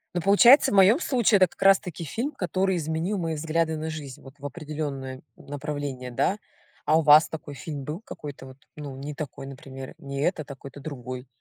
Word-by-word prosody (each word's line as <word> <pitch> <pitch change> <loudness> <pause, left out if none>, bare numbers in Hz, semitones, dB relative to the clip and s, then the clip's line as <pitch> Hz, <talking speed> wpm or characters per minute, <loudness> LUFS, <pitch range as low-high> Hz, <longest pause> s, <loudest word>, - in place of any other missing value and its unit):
Ну 175 - 0
получается, 220 - +7
в - - 0
моём 200 - +6
случае 235 - +3
это 185 - +6
как - - -21
раз 195 0 +7
таки 170 -1 -7
фильм, 235 - -3
который 190 -3 0
изменил 160 +5 -2
мои 165 -3 -2
взгляды 160 +1 0
на 155 +1 -4
жизнь, 145 -5 -7
вот, 135 - -13
в 140 - -10
определённое 145 -4 -5
направление, 145 -3 -5
да. 155 - 0 0.5
А 155 +2 +4
у - - +3
вас 150 0 +7
такой 155 -2 -7
фильм 140 0 -6
был, 150 +6 -5
какой-то 145 -10 -9
вот 130 0 -12 0.2
ну 145 -3 -7
не 140 +3 -6
такой, 140 -2 -7
например, 135 -1 -9
не 140 0 -5
этот, 155 -2 -1
а - - -7
какой-то 140 +2 -11
другой, 130 -3 -7
150 Hz, 200 wpm, -26 LUFS, 140-175 Hz, 0.5 s, получается